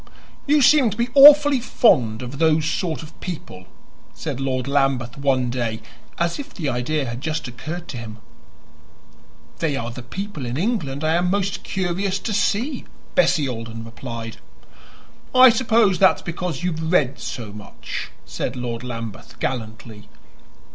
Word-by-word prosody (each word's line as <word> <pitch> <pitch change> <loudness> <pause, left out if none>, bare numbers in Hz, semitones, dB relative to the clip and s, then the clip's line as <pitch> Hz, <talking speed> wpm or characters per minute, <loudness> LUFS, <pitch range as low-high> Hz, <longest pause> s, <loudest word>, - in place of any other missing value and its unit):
"You 295 0 +4
seem 275 -3 +6
to 215 - -6
be 235 +1 0
awfully 290 0 +8
fond 125 - +2
of 130 +3 -7
those 160 -1 +3
sort 160 0 -2
of 155 - -14
people," 120 - -7 0.5
said - - -5
Lord 130 -1 -2
Lambeth 135 -4 +1
one 130 -3 +1
day, 115 -3 -2 0.4
as 170 +6 -1
if 285 - -7
the 155 -7 -2
idea 135 +4 -1
had 120 +1 -5
just 155 -2 -3
occurred 160 +8 -7
to 130 - -5
him. 110 -2 -8 1.4
"They 155 -4 0
are 120 -3 -4
the 125 - -8
people 195 +4 -6
in 120 +2 -3
England 160 - -1
I 155 +1 +2
am 175 +1 +1
most 200 0 -1
curious 190 +1 -1
to 215 +2 -4
see," 230 +7 0 0.3
Bessie 175 - +3
Alden 115 -2 -6
replied. 115 -1 -7 1.0
"I 255 0 +9
suppose 225 -5 +2
that's 190 0 +4
because 175 -4 -4
you 180 - +1
have 160 0 -3
read 140 -7 +2
so 115 -4 -6
much," 105 -1 -7 0.2
said 125 - -4
Lord 120 -2 -4
Lambeth 115 -3 -7
gallantly. 110 -3 -5
150 Hz, 155 wpm, -22 LUFS, 120-190 Hz, 1.4 s, I